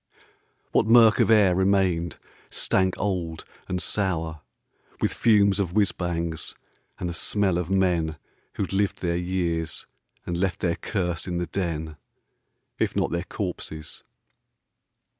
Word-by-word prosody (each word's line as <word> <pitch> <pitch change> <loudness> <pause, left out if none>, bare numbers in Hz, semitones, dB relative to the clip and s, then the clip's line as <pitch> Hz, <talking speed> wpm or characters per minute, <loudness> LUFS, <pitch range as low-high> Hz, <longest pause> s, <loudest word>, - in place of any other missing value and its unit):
What - - +3
murk 115 -2 +7
of - - +4
air 105 -5 +6
remained 95 -3 +2 0.3
stank 95 -1 +1
old, 90 -5 -2 0.2
and 90 - -2
sour 80 -4 0 0.6
With - - 0
fumes 100 -3 +4
of 90 -4 -1
whizz 105 -1 +3
bangs, 85 -2 -3 0.4
and 90 - -2
the 85 - -3
smell 95 +1 +1
of 90 0 -3
men 90 -5 +1 0.4
Who'd 100 - -2
lived 100 0 0
there 85 -1 0
years, 85 -3 -1 0.4
and 85 - -2
left 95 +1 -1
their 85 -2 +1
curse 90 -4 -2
in 90 -1 -2
the 90 - -1
den, 80 -5 -3 0.8
If - - 0
not - - +1
their 85 +1 -2
corpses 85 -6 -5
90 Hz, 135 wpm, -25 LUFS, 85-95 Hz, 0.8 s, murk